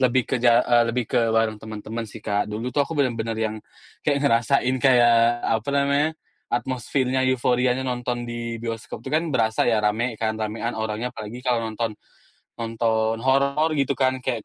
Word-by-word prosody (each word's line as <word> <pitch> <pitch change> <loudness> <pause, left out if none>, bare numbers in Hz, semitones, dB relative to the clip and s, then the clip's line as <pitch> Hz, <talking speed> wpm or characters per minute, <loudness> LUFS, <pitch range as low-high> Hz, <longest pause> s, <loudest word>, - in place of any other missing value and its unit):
lebih 130 0 +3
ke - - -3
ja 120 0 +5
eee, 120 -1 +4
lebih 120 +1 -1
ke 115 - +1
bareng 110 -1 +1
teman-teman 110 +1 -6
sih, 110 +1 -12
Kak. 105 +1 0
Dulu 115 +4 -4
tuh 145 - +1
aku 155 +2 -1
benar-benar 115 -5 0
yang 110 -1 -2 0.4
kayak 145 -1 0
ngerasain 125 +1 +2
kayak 120 -2 +4
apa 110 +2 0
namanya 140 +1 +2 0.4
atmosfernya, 130 +1 -1
euforianya 125 0 +1
nonton 125 -1 -2
di 120 -1 -5
bioskop 115 -1 -6
itu - - -6
kan 160 +2 +1
berasa 110 -6 +1
ya 115 - +3
rame 110 +3 0
kan, 110 0 -1
ramean 110 +2 -2
orangnya. 110 +3 -3
Apalagi 115 +4 -8
kalau 125 -2 +2
nonton, 110 0 -2 0.6
nonton 115 -1 0
horor 140 +4 +2
gitu 140 -2 0
kan, 130 -1 +1
kayak 120 -3 -3
120 Hz, 170 wpm, -23 LUFS, 110-130 Hz, 0.6 s, ja